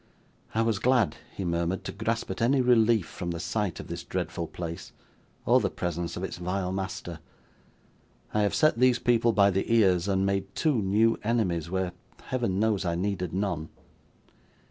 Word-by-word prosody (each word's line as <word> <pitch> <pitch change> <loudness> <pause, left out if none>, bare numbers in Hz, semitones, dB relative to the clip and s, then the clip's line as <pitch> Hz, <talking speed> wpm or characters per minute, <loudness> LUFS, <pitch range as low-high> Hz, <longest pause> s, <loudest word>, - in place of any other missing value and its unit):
'I 115 - +3
was 115 -3 0
glad,' 125 -4 +2
he 95 - -5
murmured, 85 +2 -1
'to - - -4
grasp 110 +1 -2
at 95 - -5
any 130 +4 +3
relief 115 -5 +4
from 85 - -6
the 85 -1 -3
sight 105 0 -2
of - - -7
this - - -6
dreadful 85 - -3
place, 85 0 -7 0.5
or - - +5
the - - 0
presence 85 -1 -3
of 90 - -4
its 95 - -4
vile 90 +1 -2
master. 95 -3 -4 1.1
I 105 - +2
have 100 - +1
set 155 -7 +3
these 125 -1 +5
people 120 -1 +3
by 100 -2 +4
the 95 +4 -1
ears, 95 -6 +4
and 95 -1 +1
made 100 0 -2
two 145 -8 +1
new 110 +4 +2
enemies, 95 -8 0
where, 95 -1 -1 0.3
Heaven 115 -7 -1
knows, 110 -2 +1
I 85 -2 -1
needed 90 -1 -2
none. 90 -5 -2
100 Hz, 175 wpm, -27 LUFS, 90-115 Hz, 1.1 s, or